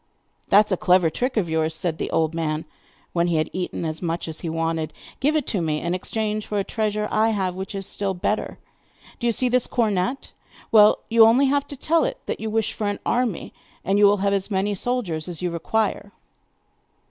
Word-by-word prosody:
'That 210 +2 +6
is 210 - -11
a 185 - +2
clever 180 -2 +3
trick 250 - -2
of 195 -5 +1
yours,' 160 0 0
said 165 -2 -3
the - - -2
old 160 0 +1
man, 160 -1 -2 0.5
when 170 0 +2
he 170 - +1
had 155 0 0
eaten 180 -2 -3
as 155 0 -4
much 170 -1 -2
as 160 -1 -6
he 170 - -3
wanted. 165 -1 -2 0.3
'Give 295 +4 +2
it 300 -4 +1
to 195 - -1
me 155 -2 0
in 170 +2 -2
exchange 215 +3 -2
for 210 - -2
a 200 - +1
treasure 210 0 -1
I 220 +1 +3
have 190 -4 -1
which 190 +2 -6
is 195 -1 -4
still 195 0 -2
better. 210 +4 -2 0.6
Do 240 - -1
you - - +4
see 250 +3 0
this 250 0 +2
cornet? 225 +2 -1 0.4
Well, 210 -1 +6
you 230 0 +4
have 225 - +9
only 265 +4 +4
to 285 0 -1
tell 330 +5 +2
it - - -2
that - - -3
you 220 - -3
wish 220 0 0
for 210 - -3
an 205 - -1
army, 240 -6 -1 0.3
and 195 +2 +2
you 205 - +7
will 205 +1 +4
have 200 - +2
as 195 0 -1
many 200 +1 0
soldiers 195 -8 -2
as 175 0 -6
you 175 - 0
require. 205 +4 -1
200 Hz, 220 wpm, -23 LUFS, 170-220 Hz, 0.6 s, have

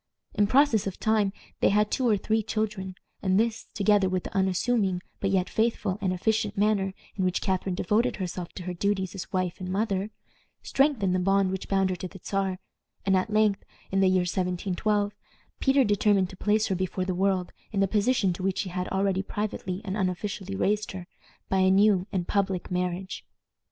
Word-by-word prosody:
In 205 - +3
process 245 -4 +4
of 190 - -5
time 215 -2 +2 0.3
they - - +4
had 210 +1 +2
two 255 -2 +1
or 210 - +4
three 220 +3 0
children, 210 -3 -3 0.3
and 190 0 +2
this, 225 0 -1
together 205 -2 +3
with 185 -1 -1
the - - -8
unassuming 190 0 +1 0.2
but 195 - 0
yet 190 -2 +1
faithful 215 -3 0
and 190 -2 +1
efficient 210 +3 0
manner 200 -2 +1 0.2
in 190 - -1
which 185 -1 +1
Catharine 190 -1 -1
devoted 225 +5 +1
herself 180 -2 -5
to 180 - -7
her 180 0 -4
duties 190 0 -1
as 190 -3 -7
wife 185 -2 -1
and 185 -1 -5
mother, 195 0 -1 0.5
strengthened 265 -10 +2
the 185 - +2
bond 195 +1 +2
which 190 0 -4
bound 195 -1 +2
her - - -1
to 185 - -5
the 190 +1 -12
Czar, 195 -2 -1 0.5
and 195 -1 +3
at 185 +2 +1
length, 215 -2 +2 0.3
in 195 - +2
the 195 - +5
year 185 0 +3
1712, 190 +3 0 0.5
Peter 270 0 +4
determined 205 -3 +2
to - - -10
place 210 +3 +2
her 195 - 0
before 185 0 -2
the 185 - -1
world 185 -1 0 0.2
in 205 - -1
the 195 - +3
position 210 -1 +2
to 175 - -7
which 190 +1 0
he 185 - -7
had 180 0 -2
already 190 0 +1
privately 195 -2 -4
and 195 -1 -3
unofficially 195 0 -2
raised 210 +1 0
her, 185 -2 -7 0.4
by 190 - +1
a 190 0 +4
new 195 -1 +4
and 185 -4 -2
public 195 -3 -1
marriage. 180 +1 -2
195 Hz, 195 wpm, -27 LUFS, 185-210 Hz, 0.5 s, the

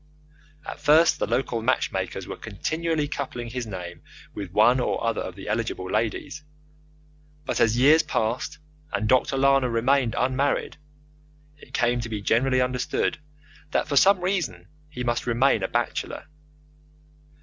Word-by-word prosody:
At - - -7
first 160 +3 +4
the - - 0
local 120 -1 -1
matchmakers 130 +3 -1
were - - -6
continually 160 -2 -2
coupling 125 -5 -5
his 125 -2 -4
name 90 -4 -7 0.3
with 100 -3 -6
one 110 +7 +4
or 125 - -1
other 115 -1 0
of 90 - -6
the 95 - -10
eligible 110 -3 -2
ladies, 115 +8 -2 1.0
but - - -2
as 115 0 +3
years 150 +6 +6
passed 110 +3 -2 0.3
and 110 - -1
Dr. 130 +3 +2
Lana 135 -1 +3
remained 120 +1 +1
unmarried, 130 +3 0 0.8
it 130 - -10
came 120 -2 +2
to 115 - -6
be 110 -2 -3
generally 130 +5 +2
understood 125 +2 -1 0.5
that - - 0
for 145 - -2
some 190 +7 +5
reason 165 - -2 0.2
he 125 -4 -6
must 120 0 -1
remain 120 -1 +3
a 95 - 0
bachelor. 120 +2 -3
125 Hz, 145 wpm, -25 LUFS, 115-140 Hz, 1.0 s, years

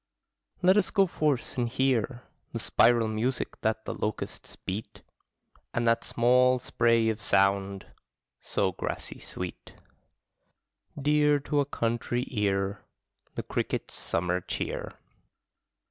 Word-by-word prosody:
Let 185 +3 +6
us 205 - +3
go 195 -2 +4
forth 150 -8 -1
and 120 -1 +1
hear 130 -1 0 0.3
The - - -2
spiral 120 -2 +4
music 115 +4 -2
that 110 0 0
the - - -3
locusts 105 - -4
beat, 100 +4 -6 0.7
And 120 0 +1
that 115 0 +3
small 125 +2 +4
spray 115 -2 +2
of 110 0 -2
sound, 100 0 +2 0.5
so - - 0
grassy - - -5
sweet, 90 -1 -7 1.2
Dear 150 +1 +4
to 145 +1 0
a 140 - +3
country 120 -1 -1
ear, 100 -2 0 0.5
The - - -3
cricket's - - -3
summer 90 +1 -1
cheer. - - -4
115 Hz, 115 wpm, -28 LUFS, 105-130 Hz, 1.2 s, Let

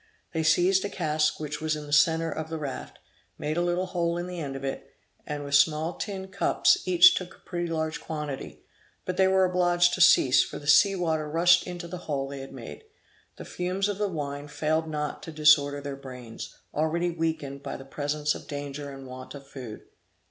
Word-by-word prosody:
They 160 - 0
seized 175 +5 +3
a 200 - -2
cask 155 -5 0
which 150 -1 -5
was 155 -1 0
in 150 -1 -7
the 145 - -6
centre 160 +2 +4
of 160 +1 -5
the 160 - -3
raft, 145 -4 -6 0.4
made 150 +1 -2
a 175 - +1
little 175 +1 0
hole 170 -2 -1
in 175 - -3
the 180 -1 -6
end 140 -4 -4
of 135 - -7
it, 135 - -5 0.3
and, 145 -1 -4
with 140 0 -6
small 155 +3 +3
tin 190 -2 -5
cups, 200 +1 +3
took - - -4
each 180 0 +7
a - - -5
pretty 175 0 -5
large 160 -1 -2
quantity; 150 -4 -6 0.4
but 185 - -2
they 190 - +5
were 190 0 +4
obliged 175 -1 +3
to 185 - -1
cease, 130 -6 +6
for - - -7
the 145 - -11
sea 195 +7 +6
water 160 -4 -1
rushed 175 +3 +4
into 175 -1 -6
the 180 +1 -6
hole 135 -2 -1
they 140 0 -7
had 135 0 -8
made. - - -10 0.5
The - - -9
fumes 185 +3 -2
of 205 -1 -3
the 210 - +1
wine 145 -4 -5
failed 155 +2 -1
not 150 -1 -3
to 160 - -8
disorder 150 -2 +4
their 140 -1 -5
brains, 125 -4 -9 0.2
already 170 +3 0
weakened 160 -4 -3
by - - -5
the 135 - -11
presence 150 +2 -1
of - - -10
danger 145 0 -5
and 135 -1 -9
want 130 +2 -9
of 140 -1 -10
food. 125 -6 -9
155 Hz, 210 wpm, -27 LUFS, 145-175 Hz, 0.5 s, each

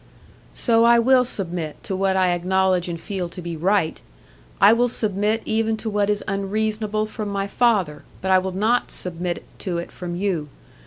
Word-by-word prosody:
"So 230 -2 +3
I 235 0 +6
will 250 +2 +5
submit 175 -9 -4
to 190 - -3
what 190 0 +1
I 185 -1 +3
acknowledge 185 0 +1
and 170 -1 -4
feel 185 -1 -4
to 175 - -10
be 170 -1 -5
right. 170 0 +1 0.6
I 200 +3 +7
will 240 +1 +3
submit 215 -1 0
even 220 0 0
to 220 0 -4
what 205 0 +1
is 210 0 0
unreasonable 215 +2 -1
from 215 -1 -5
my 200 -1 -1
father, 200 -9 +1 0.2
but 190 - -1
I 185 - +6
will 190 0 -3
not 215 +6 +1
submit 175 -1 -3 0.2
to 180 -4 -3
it 170 - -5
from 175 -1 -6
you. 175 -6 -2
195 Hz, 180 wpm, -22 LUFS, 180-215 Hz, 0.6 s, I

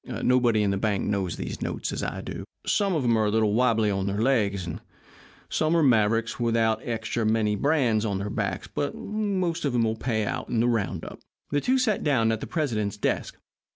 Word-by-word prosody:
Nobody 120 -4 +3
in 100 - +1
the 100 - 0
bank 100 -2 0
knows 95 -4 -1
those - - -5
notes - - -3
as - - -3
I - - -3
do. - - -6 0.2
Some 200 -3 +1
of 150 - 0
'em 120 -2 +3
are 110 - +2
a - - +2
little 110 -1 +2
wobbly 115 -3 +3
on 95 0 -1
their 100 +1 -1
legs, 105 -7 +1
and 85 - -6 0.7
some 160 +2 +1
are 165 - +3
mavericks 115 -2 +2
without 115 -2 +1
extra 115 0 -2
many 110 -1 +2
brands 125 -4 +2
on 100 -3 -1
their 100 +2 -4
backs, 100 -4 -2
but 145 - -3
they'll - - -9
most 195 -5 -1
all 120 -5 +1
pay 110 -2 -1
out - - -4
at 115 - +1
the 120 - +3
round 115 -6 -1
up." - - -9 0.3
The 145 - +1
two 260 - +2
sat 230 -6 +1
down 125 -7 +2
at 110 - -1
the - - -6
president's 110 - -1
desk. - - -2
115 Hz, 215 wpm, -26 LUFS, 105-135 Hz, 0.7 s, Nobody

